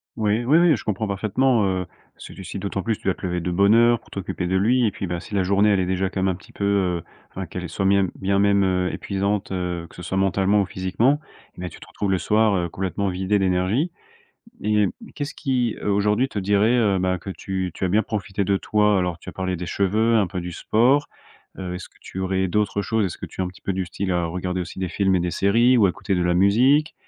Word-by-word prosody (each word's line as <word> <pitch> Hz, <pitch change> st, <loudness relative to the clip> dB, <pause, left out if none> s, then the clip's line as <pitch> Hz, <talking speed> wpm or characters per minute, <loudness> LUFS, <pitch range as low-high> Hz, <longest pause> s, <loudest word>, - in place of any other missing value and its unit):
Oui, 110 Hz, +1 st, +1 dB
oui, 150 Hz, +6 st, +5 dB
oui, 170 Hz, -4 st, +5 dB
je -, -, -7 dB
comprends 105 Hz, +1 st, -2 dB
parfaitement, 110 Hz, +4 st, +1 dB
heu, 95 Hz, -1 st, -1 dB, 0.3 s
parce -, -, -12 dB
que -, -, -10 dB
tu 95 Hz, -, -10 dB
si 100 Hz, -, -6 dB
d'autant 100 Hz, 0 st, -3 dB
plus 115 Hz, 0 st, -1 dB
tu -, -, -26 dB
dois 95 Hz, -, +1 dB
te -, -, -17 dB
lever 90 Hz, 0 st, -1 dB
de 90 Hz, +1 st, -3 dB
bonne 100 Hz, +4 st, +4 dB
heure 120 Hz, -1 st, +5 dB
pour -, -, -23 dB
t'occuper 95 Hz, -2 st, -4 dB
de 95 Hz, -, 0 dB
lui 120 Hz, +5 st, +3 dB
et -, -, 0 dB
puis, 100 Hz, -, -5 dB
bah, 85 Hz, -1 st, -3 dB
si 105 Hz, -, -8 dB
la 95 Hz, -, +2 dB
journée 100 Hz, +3 st, +3 dB
elle 100 Hz, -, +3 dB
est 90 Hz, -, +1 dB
déjà 95 Hz, +1 st, 0 dB
quand 95 Hz, -1 st, -2 dB
même 95 Hz, -, +2 dB
un -, -, -7 dB
petit 95 Hz, -, -16 dB
peu, 100 Hz, -, -5 dB
heu, 95 Hz, -4 st, +1 dB, 0.3 s
enfin 95 Hz, 0 st, -6 dB
qu'elle 90 Hz, 0 st, -6 dB
soit 95 Hz, -, -2 dB
mien 100 Hz, -1 st, +4 dB
bien 100 Hz, +1 st, 0 dB
même, 100 Hz, -1 st, +3 dB
heu, 90 Hz, -1 st, +1 dB
épuisante, 100 Hz, 0 st, -2 dB
heu, 90 Hz, -2 st, -3 dB
que -, -, -18 dB
ce 90 Hz, -, -9 dB
soit 95 Hz, -, -3 dB
mentalement 95 Hz, +1 st, +2 dB
ou -, -, 0 dB
physiquement 100 Hz, +11 st, +1 dB, 0.4 s
et -, -, -10 dB
ben, 90 Hz, -, -4 dB
tu -, -, -13 dB
te -, -, -12 dB
retrouves 100 Hz, -, -3 dB
le 95 Hz, -, +2 dB
soir, 105 Hz, +4 st, +2 dB
heu, 85 Hz, -1 st, 0 dB
complètement 95 Hz, +2 st, -2 dB
vidée 95 Hz, +3 st, 0 dB
d'énergie 95 Hz, -, +1 dB, 0.7 s
et 105 Hz, 0 st, +2 dB
hem, 100 Hz, -, +2 dB, 0.2 s
qu'est-ce 145 Hz, -1 st, -4 dB
qui, 125 Hz, -5 st, -1 dB
heu, -, -, -3 dB
aujourd'hui 105 Hz, +5 st, +2 dB
te 105 Hz, -, -5 dB
dirait, 100 Hz, +4 st, +2 dB
heu, 100 Hz, -5 st, +2 dB
ben, 95 Hz, 0 st, +1 dB
que 95 Hz, -, -7 dB
tu 95 Hz, -1 st, -3 dB
tu 95 Hz, -, -4 dB
as -, -, +1 dB
bien 105 Hz, +4 st, +3 dB
profité 100 Hz, -2 st, -3 dB
de 100 Hz, 0 st, +1 dB
toi? 105 Hz, -2 st, +2 dB
Alors, 90 Hz, -2 st, -1 dB
tu -, -, -9 dB
as -, -, -17 dB
parlé 95 Hz, -1 st, -2 dB
des 90 Hz, -, -5 dB
cheveux, 110 Hz, +6 st, +1 dB
un 105 Hz, -4 st, +3 dB
peu 90 Hz, -1 st, -5 dB
du 90 Hz, 0 st, -6 dB
sport, 125 Hz, -, +2 dB, 0.5 s
heu, 90 Hz, -2 st, -4 dB
est-ce 90 Hz, -, -7 dB
que -, -, -29 dB
tu 95 Hz, -, -8 dB
aurais 95 Hz, 0 st, 0 dB
d'autres 100 Hz, +1 st, 0 dB
choses? 105 Hz, +1 st, 0 dB
Est-ce 85 Hz, -, -6 dB
que -, -, -7 dB
tu -, -, -8 dB
es -, -, +1 dB
un -, -, -3 dB
petit 90 Hz, -, -15 dB
peu 100 Hz, -, -1 dB
du 95 Hz, -1 st, -2 dB
style 95 Hz, +2 st, -3 dB
à 85 Hz, -1 st, 0 dB
regarder 90 Hz, +2 st, -3 dB
aussi 90 Hz, +1 st, -7 dB
des 95 Hz, -1 st, -2 dB
films 95 Hz, +1 st, +1 dB
et 90 Hz, -, +1 dB
des 90 Hz, 0 st, -1 dB
séries 120 Hz, +7 st, +3 dB
ou 105 Hz, -, +5 dB
à -, -, +2 dB
écouter 95 Hz, +2 st, -2 dB
de 90 Hz, -, +1 dB
la 90 Hz, 0 st, +1 dB
musique? 125 Hz, -, +4 dB
95 Hz, 275 wpm, -23 LUFS, 90-105 Hz, 0.7 s, oui